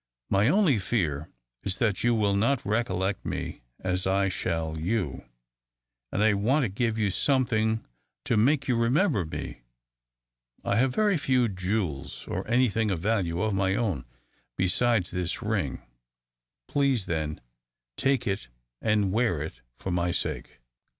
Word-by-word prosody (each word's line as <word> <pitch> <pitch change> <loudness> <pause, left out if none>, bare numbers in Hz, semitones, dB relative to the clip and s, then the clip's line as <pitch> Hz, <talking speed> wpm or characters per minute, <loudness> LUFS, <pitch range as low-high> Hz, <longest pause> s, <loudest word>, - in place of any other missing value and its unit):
My 100 +3 +4
only 180 - +4
fear 80 -8 -1 0.3
is 95 -1 -3
that 110 -5 +1
you 120 -1 +3
will 100 -2 +2
not 115 +5 +1
recollect 100 -3 0
me - - -4 0.2
as 90 0 -1
I 95 0 +2
shall 80 -3 -2
you; 85 - -2 0.8
and 105 - +1
I 110 -1 +5
want 125 +9 +2
to 120 - 0
give 110 +3 -1
you 105 -3 +1
something 110 -3 +1 0.4
to - - +1
make 135 +6 +3
you 125 - +2
remember 120 - +2
me. 80 - -6 1.0
I 100 - +1
have 130 +1 +2
very 210 -4 +3
few 130 -4 +2
jewels 90 -6 -3
or - - -3
any 125 +2 +4
thing 110 0 0
of 95 -4 -1
value 90 -3 0
of 110 -1 +1
my 95 0 +1
own, 100 - -1 0.5
besides 95 +2 +2
this 90 -1 -2
ring. - - -1 0.8
Please, 135 -7 +1
then, 75 -2 -2 0.6
take 135 - +1
it 100 - -2 0.3
and 105 -3 +2
wear 100 -9 +1
it 75 - -8 0.2
for 95 - -4
my 90 0 +1
sake." - - -3
105 Hz, 150 wpm, -27 LUFS, 90-120 Hz, 1.0 s, I